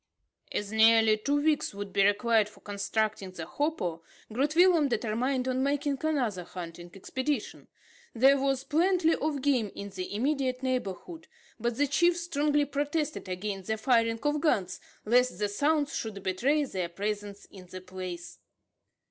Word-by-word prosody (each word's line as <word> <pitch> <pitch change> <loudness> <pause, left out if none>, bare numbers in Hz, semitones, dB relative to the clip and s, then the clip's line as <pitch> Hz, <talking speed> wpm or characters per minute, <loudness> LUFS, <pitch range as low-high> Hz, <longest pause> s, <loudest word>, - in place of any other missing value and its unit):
As 205 0 -3
nearly 220 0 +5
two 285 +7 0
weeks 300 -9 +1
would 200 -1 -6
be 200 - +4
required 210 +1 +3
for - - -19
constructing 205 0 -2
the 170 -3 -7
hopo, 180 - -2 0.3
Groot 285 +6 0
Willem 345 -4 +5
determined 250 +2 -1
on 255 0 0
making 280 0 0
another 250 - 0
hunting 175 0 -8
expedition. 260 +5 -3 0.5
There 270 +4 +5
was 270 -1 0
plenty 330 +2 +2
of 290 -2 -2
game 250 -8 +1
in 200 0 -6
the 190 +1 -5
immediate 260 +1 0
neighbourhood; 255 - -3 0.3
but 235 +1 -1
the 290 - +2
chief 345 +5 +3
strongly 295 -4 +1
protested 290 - -2
against 195 +1 -4
the 220 - -1
firing 230 -1 +2
of 295 0 +1
guns, 195 - +1 0.3
lest 250 +3 +3
the 210 - 0
sounds 290 +7 0
should 205 -4 -5
betray 270 +11 +1
their 185 -8 -3
presence 205 +2 -4
in 185 -2 -13
the 185 +1 -8
place. 180 -1 -8
240 Hz, 150 wpm, -29 LUFS, 200-290 Hz, 0.5 s, nearly